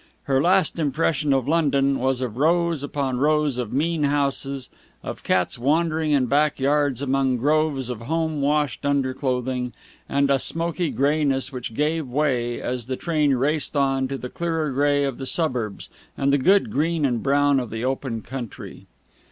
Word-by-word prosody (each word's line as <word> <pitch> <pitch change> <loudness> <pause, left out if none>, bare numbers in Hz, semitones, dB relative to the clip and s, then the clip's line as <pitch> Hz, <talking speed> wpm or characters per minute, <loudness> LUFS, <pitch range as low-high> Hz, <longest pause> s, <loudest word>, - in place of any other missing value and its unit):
Her 135 -1 +1
last 180 0 +2
impression 150 0 0
of 135 -2 +1
London 140 -4 +2
was 130 0 0
of 120 -3 -4
rows 170 +1 +2
upon 140 -3 -2
rows 150 -2 +1
of 120 -4 -3
mean 160 +4 0
houses, 140 -2 -1 0.3
of - - -6
cats 90 +5 0
wandering 155 +4 +1
in 140 -3 +3
back 145 +3 +1
yards 140 -1 +1
among 135 -1 +1
groves 145 0 +1
of 120 -3 -5
home 160 +3 -2
washed 145 -2 0
underclothing, 130 -2 -1 0.4
and 140 0 +2
a 135 - +3
smoky 170 +2 +1
greyness 140 -1 +1
which 125 -3 -6
gave 155 +1 0
way, 125 -3 0
as 125 -2 -4
the 130 - -2
train 150 -5 +1
raced 145 +3 0
on, 135 -1 +1
to 135 +1 -4
the 125 - -6
clearer 165 -2 -2
grey 145 +1 +2
of 135 -2 -3
the 135 - -5
suburbs 125 - -1 0.3
and 140 0 +1
the 140 - +3
good 195 +9 +3
green 160 +1 0
and 120 -4 0
brown 140 0 +3
of 125 -3 -4
the 115 +2 -4
open 130 -4 -3
country. 125 -4 -8
140 Hz, 170 wpm, -23 LUFS, 130-150 Hz, 0.4 s, in